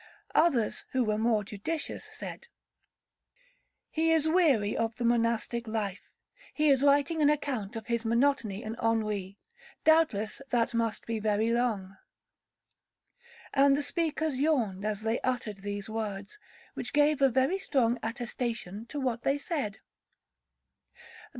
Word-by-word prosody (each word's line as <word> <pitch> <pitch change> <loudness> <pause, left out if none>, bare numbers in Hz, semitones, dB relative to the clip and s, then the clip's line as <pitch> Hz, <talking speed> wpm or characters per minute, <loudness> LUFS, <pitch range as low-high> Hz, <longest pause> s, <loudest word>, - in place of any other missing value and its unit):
Others, 270 -10 +2
who 260 -1 +3
were 215 -1 0
more 220 -2 +2
judicious, 220 +11 -5
said, 480 - -8 1.4
'He 325 +1 +2
is 320 -1 +3
weary 295 - +3
of 225 0 -1
the 245 - -3
monastic 235 0 +1
life, 210 -4 -3 0.5
he 305 0 +3
is 270 -2 +4
writing 285 +3 +3
an 290 - +5
account 260 -8 -1
of 225 -2 -5
his 235 -1 -1
monotony 235 -3 +1
and 220 +1 -4
ennui, 210 -4 -1 0.5
doubtless 310 -10 +3
that 240 +1 +1
must 230 -2 -1
be 230 -1 -2
very 215 +1 +1
long;' 210 -6 -1 1.6
and 275 0 +5
the 290 - -1
speakers 315 -4 -1
yawned 235 -10 +1
as 210 -1 -2
they 225 +1 0
uttered 245 -5 -2
these 205 0 -5
words, 215 - -5 0.3
which 245 - -6
gave 295 0 +3
a 270 - +6
very 265 +10 +1
strong 245 -8 +1
attestation 230 -2 -4
to 290 - -5
what 250 -3 -1
they 275 +1 +1
said. 280 - -3
235 Hz, 135 wpm, -29 LUFS, 215-285 Hz, 1.6 s, a